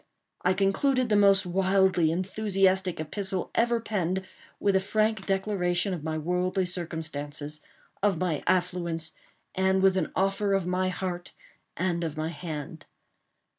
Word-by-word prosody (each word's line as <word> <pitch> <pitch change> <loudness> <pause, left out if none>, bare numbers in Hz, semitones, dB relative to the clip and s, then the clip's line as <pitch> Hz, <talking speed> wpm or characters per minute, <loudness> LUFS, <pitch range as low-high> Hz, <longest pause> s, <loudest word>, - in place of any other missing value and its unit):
I 185 +1 +2
concluded 245 +6 +2
the 210 - +3
most 200 -1 +5
wildly 190 -2 +3
enthusiastic 190 0 +1
epistle 190 +3 -2
ever 235 0 +2
penned, 190 -4 -2 0.3
with 200 -1 +2
a - - +5
frank 215 +1 0
declaration 195 -2 0
of 165 -4 -5
my 155 0 -2
worldly 180 +3 0
circumstances—of 160 +2 -4
my 165 -4 -1
affluence—and 180 +2 -1
with 190 -1 +5
an - - -1
offer 195 +1 +1
of 195 -3 +1
my 185 +1 0
heart 180 -1 -4 0.4
and 175 -1 0
of 160 -2 -4
my 155 +1 -1
hand. 160 -2 -7
185 Hz, 130 wpm, -28 LUFS, 170-195 Hz, 0.4 s, most